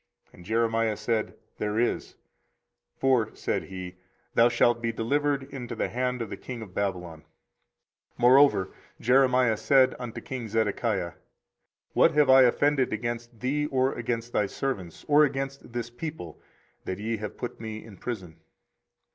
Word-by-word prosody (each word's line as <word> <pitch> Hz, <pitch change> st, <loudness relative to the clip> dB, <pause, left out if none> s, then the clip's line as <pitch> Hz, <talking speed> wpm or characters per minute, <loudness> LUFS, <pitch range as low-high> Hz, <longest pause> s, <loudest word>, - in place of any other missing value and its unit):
And 90 Hz, -, -14 dB
Jeremiah 115 Hz, +1 st, +1 dB
said, 115 Hz, -2 st, -1 dB, 0.2 s
There 105 Hz, 0 st, -1 dB
is: 120 Hz, +1 st, -1 dB, 0.8 s
for, 125 Hz, -5 st, +2 dB
said -, -, -2 dB
he, 95 Hz, -1 st, -8 dB, 0.4 s
thou 115 Hz, +1 st, +5 dB
shalt 120 Hz, 0 st, +2 dB
be 115 Hz, 0 st, 0 dB
delivered 140 Hz, +5 st, 0 dB
into 125 Hz, -3 st, -7 dB
the -, -, -1 dB
hand 125 Hz, 0 st, -1 dB
of 115 Hz, -, -9 dB
the -, -, -5 dB
king 120 Hz, -3 st, -7 dB
of 95 Hz, -4 st, -13 dB
Babylon. 90 Hz, -5 st, -3 dB
24:037:018 -, -, -24 dB, 0.9 s
Moreover 125 Hz, -5 st, +5 dB, 0.3 s
Jeremiah 125 Hz, -2 st, +4 dB
said 130 Hz, +1 st, +4 dB
unto 120 Hz, -2 st, -6 dB
king 130 Hz, -6 st, -6 dB
Zedekiah, 105 Hz, -4 st, 0 dB, 0.8 s
What -, -, +5 dB
have 150 Hz, -3 st, +5 dB
I 135 Hz, 0 st, +8 dB
offended 135 Hz, +2 st, +3 dB
against 120 Hz, -1 st, -4 dB
thee, 145 Hz, +4 st, 0 dB
or 130 Hz, -1 st, +1 dB
against 120 Hz, 0 st, -3 dB
thy 105 Hz, -, +2 dB
servants, 95 Hz, -8 st, -4 dB
or 150 Hz, +1 st, +6 dB
against 135 Hz, -2 st, -3 dB
this 120 Hz, 0 st, -4 dB
people, 120 Hz, -, -7 dB, 0.4 s
that 95 Hz, -, -3 dB
ye 110 Hz, +2 st, -2 dB
have 105 Hz, -1 st, -6 dB
put 120 Hz, -, -6 dB
me 110 Hz, -1 st, -6 dB
in 105 Hz, -4 st, -13 dB
prison? 95 Hz, -10 st, -6 dB
120 Hz, 150 wpm, -27 LUFS, 110-130 Hz, 0.9 s, I